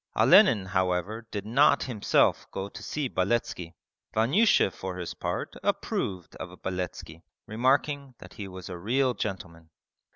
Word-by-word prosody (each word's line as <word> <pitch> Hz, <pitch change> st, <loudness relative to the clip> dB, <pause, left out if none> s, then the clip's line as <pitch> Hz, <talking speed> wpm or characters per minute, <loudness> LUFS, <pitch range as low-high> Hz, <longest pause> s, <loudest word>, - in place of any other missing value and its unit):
Olenin 100 Hz, -4 st, +6 dB
however 95 Hz, +4 st, -1 dB
did 105 Hz, -2 st, -5 dB
not 140 Hz, +6 st, +4 dB
himself 115 Hz, -6 st, +1 dB
go 95 Hz, 0 st, -4 dB
to -, -, -10 dB
see 150 Hz, -3 st, -3 dB
Beletski. 95 Hz, -5 st, -1 dB, 0.4 s
Vanyusha 135 Hz, -, +4 dB
for 95 Hz, -1 st, -6 dB
his 90 Hz, -2 st, -5 dB
part -, -, -4 dB
approved 90 Hz, -3 st, -2 dB
of -, -, -9 dB
Beletski, 90 Hz, -3 st, -5 dB, 0.2 s
remarking 135 Hz, +4 st, 0 dB
that -, -, -13 dB
he 100 Hz, -, -7 dB
was 95 Hz, -1 st, -9 dB
a 90 Hz, -2 st, -7 dB
real 125 Hz, +6 st, +1 dB
gentleman. 85 Hz, -7 st, -6 dB
100 Hz, 135 wpm, -27 LUFS, 90-125 Hz, 0.4 s, Olenin